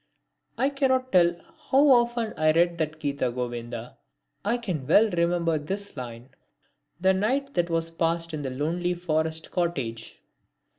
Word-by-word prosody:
I 270 - +2
cannot 260 -2 +1
tell 175 -2 +4 0.3
how 275 +3 +5
often 240 -3 +3
I 155 0 +3
read 170 +1 +2
that 155 0 -2
Gita 140 -4 -1
Govinda. 120 -1 -5 0.4
I 230 +4 +1
can 180 - -4
well 210 +7 +5
remember 170 -2 +1
this 195 +7 -5
line: 120 -1 -8 0.7
The 190 +1 +4
night 265 +9 0
that 175 0 0
was 165 0 -1
passed 165 0 -1
in 155 - -3
the 135 - -3
lonely 170 +7 -1
forest 160 -2 -2
cottage. 135 -11 -3
170 Hz, 145 wpm, -26 LUFS, 150-200 Hz, 0.7 s, how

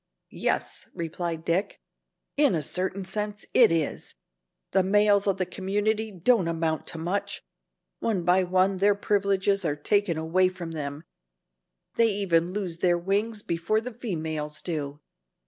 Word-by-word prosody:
"Yes," - - -2
replied 165 0 -4
Dick, 185 +4 0 0.6
"in 285 -9 +4
a 155 - -1
certain 190 +3 -2
sense 210 +1 -4
it 235 -6 +6
is. 165 -3 -2 0.6
The 190 - +4
males 205 +1 +3
of 195 -1 +2
the 185 - 0
community 210 +4 -1
don't 190 +1 +2
amount 160 -1 -1
to 165 - -6
much. 175 +5 -2 0.6
One 205 -6 0
by 180 +2 +4
one 185 +1 +2
their 200 +2 +4
privileges 200 -1 +1
are 150 -4 0
taken 180 +3 +1
away 175 +4 +2
from 180 -3 -7
them. 145 -1 -5 0.9
They 230 - +5
even 175 -4 +1
lose 185 -4 -3
their 175 -1 +3
wings 205 +4 -1
before 170 +6 0
the 245 +2 -7
females 160 -9 -4
do. 150 -4 -4
185 Hz, 145 wpm, -26 LUFS, 165-205 Hz, 0.9 s, it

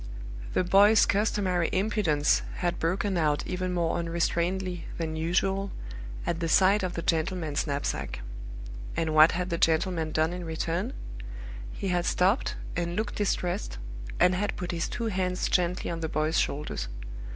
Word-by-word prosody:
The - - +2
boy's 200 +4 +6
customary 195 -4 +1
impudence 185 -7 +2
had 175 -1 -1
broken 185 +3 0
out 150 -3 +1
even 185 0 -2
more 170 -2 +1
unrestrainedly 170 +2 -1
than 160 -1 -2
usual 190 +4 +1 0.6
at 170 -1 -1
the 165 -1 -1
sight 195 +4 +5
of 185 -1 -2
the 170 - -3
gentleman's 160 -2 0
knapsack. 140 - -2 0.8
And 160 -1 0
what 155 +1 +7
had 180 +1 -2
the 170 - 0
gentleman 160 0 +2
done 160 +2 +1
in 180 0 -5
return? 165 +7 -2 0.8
He 195 - -3
had 175 -1 +1
stopped 195 +8 +2 0.2
and 170 0 -1
looked 215 +1 -1
distressed, 175 - -1 0.4
and 180 - +5
had 205 +3 -1
put 180 - -3
his 170 -1 -2
two 235 - -3
hands 185 -3 0
gently 180 0 +1
on 165 - -3
the 160 -1 -2
boy's 155 +2 +1
shoulders. 145 - -2
175 Hz, 150 wpm, -28 LUFS, 165-190 Hz, 0.8 s, what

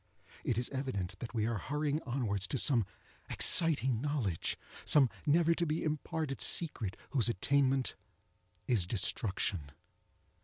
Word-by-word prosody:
It 115 - -1
is 120 - 0
evident 100 -9 -4
that 120 0 -8
we 110 -2 0
are 115 -2 -2
hurrying 150 - -2
onwards 105 -7 -2
to 135 - -2
some 120 -7 +2 0.4
exciting 135 -9 +3
knowledge—some 135 - 0 0.2
never 165 +2 +3
to 170 +1 -1
be 155 +2 -2
imparted 155 -1 -3
secret, 125 - +3
whose 120 -4 +3
attainment 135 +4 +1 0.7
is 110 -9 +2
destruction. 95 - -1
130 Hz, 120 wpm, -32 LUFS, 110-150 Hz, 0.7 s, exciting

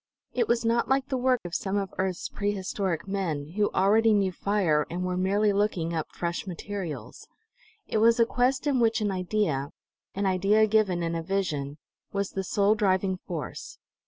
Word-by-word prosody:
It 240 -3 +1
was 235 0 +1
not 230 +1 +1
like 270 +1 +1
the 265 - 0
work 255 -1 +2
of 175 - -6
some 195 +2 -1
of 195 -1 -3
earth's 185 -2 -1
prehistoric 200 -3 -2
men, 165 -7 -2
who 205 +5 +1
already 215 +3 +4
knew 195 -2 +2
fire 180 -6 +1
and 180 +1 -3
were 180 0 -1
merely 200 +3 +2
looking 195 -5 0
up 160 -2 -2
fresh 170 +2 -3
materials; 185 -2 -6 0.6
it 220 - 0
was 230 +2 +5
a 230 - +6
quest 255 +4 +1
in 280 -3 +2
which 230 0 +3
an 210 -2 0
idea, 180 -7 -1 0.5
an 200 +1 -1
idea 195 +3 +3
given 205 -5 +2
in 165 0 -1
a 165 - -2
vision, 160 -6 -2 0.3
was 200 -1 -2
the 195 - -3
sole 200 +2 +2
driving 190 -3 +1
force. 160 -7 -6
195 Hz, 180 wpm, -27 LUFS, 180-215 Hz, 0.6 s, a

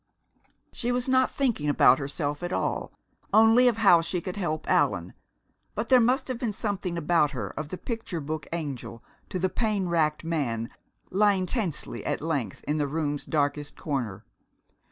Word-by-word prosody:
She 240 0 -1
was 245 +1 0
not 260 0 +3
thinking 235 - 0
about 130 -2 +5
herself 145 +1 -2
at 175 0 -3
all, - - -1 0.4
only 225 +3 +6
of 235 -3 +2
how 195 -6 +6
she 175 +2 -2
could 185 0 -5
help 155 -6 -3
Allan, - - +1 0.6
but - - -3
there 255 -1 +7
must 250 +3 +2
have 255 -3 -3
been 230 -4 -2
something 195 -5 -3
about 165 -2 +3
her 105 -7 -4
of 155 -1 -6
the 185 - -5
picture 225 -7 -4
book 155 +1 -5
angel 140 -8 -5 0.3
to - - -3
the 185 +1 +1
pain 210 -2 -1
racked 155 -2 +1
man, 130 -9 -2 0.4
lying 195 -1 +3
tensely 190 - -2
at - - -1
length 145 - -3
in 150 - +1
the 145 -1 0
room's 145 -1 -2
darkest 145 -1 -1
corner. 125 - -3
170 Hz, 170 wpm, -27 LUFS, 145-215 Hz, 0.6 s, there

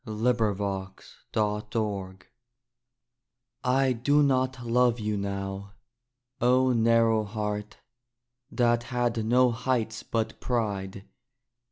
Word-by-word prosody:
THE 110 - -6
END 120 +1 +1
OF 105 -2 0
ALL 100 +1 -3
I - - -23 1.7
I 130 -1 +2
do 145 +5 +2
not 130 -2 0
love 120 0 +2
you 105 -1 -1
now, 100 0 -4 0.7
O 125 +1 +4
narrow 115 -1 +3
heart, 105 0 -4 0.7
that 120 -3 +2
had 120 -3 0
no 125 +2 +4
heights 115 -1 -1
but 115 -1 -3
pride! 100 -5 -2
115 Hz, 100 wpm, -27 LUFS, 105-125 Hz, 1.7 s, O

